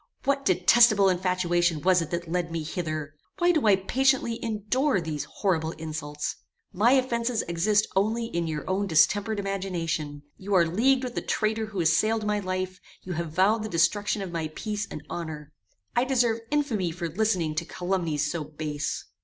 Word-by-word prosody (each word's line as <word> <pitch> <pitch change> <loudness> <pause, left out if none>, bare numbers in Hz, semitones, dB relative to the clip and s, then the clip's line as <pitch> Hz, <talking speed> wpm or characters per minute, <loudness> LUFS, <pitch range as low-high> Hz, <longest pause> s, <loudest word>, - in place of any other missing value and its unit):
"What 275 0 0
detestable 200 +2 +5
infatuation 175 -2 +1
was 185 -1 +4
it 165 - -4
that 170 0 -3
led 170 0 -2
me 165 -1 -3
hither! 155 -2 -4 0.2
Why 350 0 +4
do 310 -9 +1
I 200 - +7
patiently 240 +4 +1
endure 225 +3 0
these 155 -3 -4
horrible 160 -1 -1
insults! 155 -2 -5 0.4
My 225 +7 +4
offences 240 -3 +1
exist 205 +5 +2
only 220 +4 +1
in 170 -7 -2
your 155 -1 -4
own 195 +2 0
distempered 205 +6 +3
imagination: 165 -7 -3
you 195 +1 -2
are 175 -2 +5
leagued 250 +10 +2
with 250 -2 -4
the - - -2
traitor 220 0 -1
who 200 -4 -3
assailed 215 +7 +2
my 210 0 +1
life: 185 -1 -3 0.2
you 185 - -5
have 170 -1 -3
vowed 195 +7 +3
the 215 - -4
destruction 200 +4 +1
of 185 - -6
my 165 -2 -2
peace 210 -1 -3
and 150 - -7
honor. 155 -3 -6 0.4
I 240 - +3
deserve 245 -4 +2
infamy 245 -12 0
for 170 +1 -4
listening 180 -3 0
to 165 - -2
calumnies 170 -5 -1
so 170 -3 -3
base!" 150 0 -4
185 Hz, 170 wpm, -26 LUFS, 165-220 Hz, 0.4 s, I